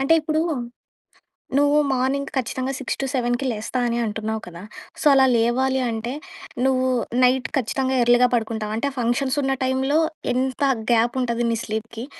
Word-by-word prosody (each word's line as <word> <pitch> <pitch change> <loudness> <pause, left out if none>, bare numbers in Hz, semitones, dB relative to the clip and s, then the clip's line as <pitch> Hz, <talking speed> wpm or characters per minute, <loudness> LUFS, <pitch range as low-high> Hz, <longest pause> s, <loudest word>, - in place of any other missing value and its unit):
అంటే 275 +5 +4
ఇప్పుడు, 310 +1 -1 1.2
నువ్వు 290 +1 +4
మార్నింగ్ 265 +2 0
ఖచ్చితంగా 260 +2 -2
6-7కి 255 -1 -2
లేస్తా 220 +3 -3
అని 235 0 -1
అంటున్నావు 220 0 -3
కదా! 170 0 -10 0.4
సో, - - -5
అలా 265 -1 +6
లేవాలి 260 +3 +1
అంటే 230 +3 -3 0.5
నువ్వు 260 -1 +2 0.4
నైట్ 250 -1 +3
ఖచ్చితంగా 265 +2 -1
ఎర్లీగా 245 +1 +5
పడుకుంటావు. 220 -2 -2
అంటే 280 +4 -1
ఫంక్షన్స్ 255 +4 0
ఉన్న 270 0 +1
టైంలో 265 +4 +1 0.3
ఎంత 260 +2 -1 0.3
గ్యాప్ 235 +3 +2
ఉంటది 235 -1 -1
నీ 230 - 0
స్లీప్‌కి? 225 +2 -5
255 Hz, 140 wpm, -22 LUFS, 230-265 Hz, 1.2 s, అలా